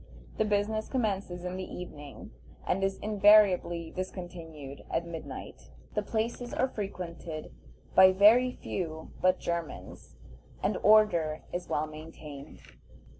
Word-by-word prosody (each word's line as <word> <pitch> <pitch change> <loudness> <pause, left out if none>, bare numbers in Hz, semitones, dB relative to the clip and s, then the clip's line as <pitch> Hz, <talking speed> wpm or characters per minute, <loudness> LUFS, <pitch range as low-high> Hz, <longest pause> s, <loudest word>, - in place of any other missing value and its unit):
The 220 - +3
business 210 +1 0
commences 195 -7 -2
in 180 +1 -3
the 190 - -4
evening, 150 -6 -9 0.3
and 195 +2 0
is 195 0 0
invariably 200 -5 +4
discontinued 165 -6 -7
at 170 - -1
midnight. 165 -2 -8 0.2
The 210 - 0
places 230 +3 -3
are 260 - +2
frequented 175 -7 -6 0.4
by 190 0 +8
very 220 +7 +6
few 160 -9 -5
but 185 0 +4
Germans, 170 - -5 0.5
and 200 - +1
order 175 -8 +4
is 175 - -4
well 150 - 0
maintained. 155 -2 -10
185 Hz, 120 wpm, -30 LUFS, 165-210 Hz, 0.5 s, by